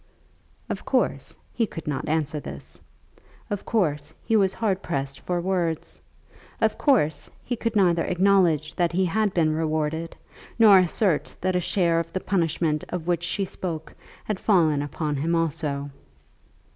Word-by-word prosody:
Of - - -4
course - - -1 0.2
he 230 -2 0
could 165 - -8
not 150 +1 -3
answer 155 -1 0
this. - - -9 0.7
Of 205 - -3
course 155 -8 0
he 225 - +2
was 195 -3 +3
hard 200 -4 0
pressed 135 -4 -3
for 180 -1 -2
words. 170 -3 -2 0.6
Of - - +2
course 155 - +1
he 245 - -2
could 230 -1 -3
neither 175 -5 +3
acknowledge 180 -5 +2
that 175 -1 0
he 185 +2 +2
had 210 +4 +1
been 160 -4 +2
rewarded, 160 +1 -2 0.4
nor 210 -4 +8
assert 185 -2 +1
that 185 0 0
a - - +3
share 170 -2 +1
of 165 0 -5
the 185 - -1
punishment 165 -5 0
of 175 -3 -4
which 175 -1 0
she 195 +3 -1
spoke 165 -4 -5 0.3
had 210 -3 -3
fallen 160 -8 +3
upon 145 0 -3
him 165 +5 0
also. 150 -3 -2
170 Hz, 155 wpm, -25 LUFS, 155-190 Hz, 0.7 s, nor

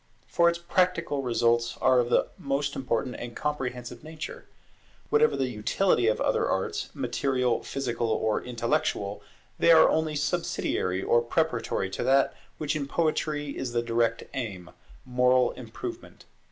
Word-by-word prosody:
For 170 0 +3
its 170 - -2
practical 170 -4 0
results 120 -2 +1
are 130 -1 +4
of 120 -1 +1
the - - +3
most 140 +1 -1
important 125 -1 -2
and 120 -1 -7
comprehensive 125 -4 -4
nature. 155 0 -8 0.7
Whatever 455 +1 +4
the 130 - 0
utility 120 - +1
of 110 - +2
other - - +1
arts, - - -2
material, 125 -3 0
physical, 120 -4 -2
or 110 -1 0
intellectual, 115 -4 -1 0.4
they - - +4
are 160 - +7
only 155 -1 0
subsidiary 95 -9 -1
or 120 - +3
preparatory 120 -7 -1
to - - -3
that 135 +1 +3 0.2
which 150 -1 -2
in 140 -2 -2
Poetry 150 -2 -1
is 125 -3 -4
the 120 0 +1
direct 115 0 0
aim, 95 -9 -5 0.3
moral 125 0 +3
improvement. - - -8
125 Hz, 140 wpm, -27 LUFS, 115-150 Hz, 0.7 s, are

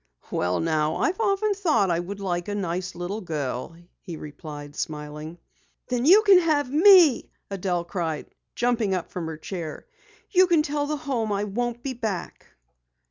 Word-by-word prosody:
"Well, 90 +1 0
now 155 -1 +1
I've 370 - 0
often 415 -1 +1
thought 305 - +2
I 170 - +1
would 195 +3 -6
like 175 -3 -2
a 205 - -3
nice 180 -1 -3
little 180 +5 -4
girl," 150 -3 -4 0.3
he 170 -4 -7
replied, 145 -1 -9
smiling. 150 +2 -5 0.5
"Then 250 +2 0
you 405 +6 +8
can 395 -3 +7
have 300 -6 +1
me!" 345 - +6 0.2
Adelle 180 -3 -1
cried, 170 -3 -3 0.3
jumping 235 -5 +1
up 180 - -5
from 170 -3 -4
her 160 -1 -5
chair. 165 -1 -6 0.5
"You 370 -1 +5
can 335 -3 +3
tell 290 0 -2
the 300 0 -2
Home 260 -7 -2
I 200 0 0
won't 240 +3 -3
be 270 - -3
back!" 220 -7 -5
200 Hz, 165 wpm, -25 LUFS, -, 0.5 s, you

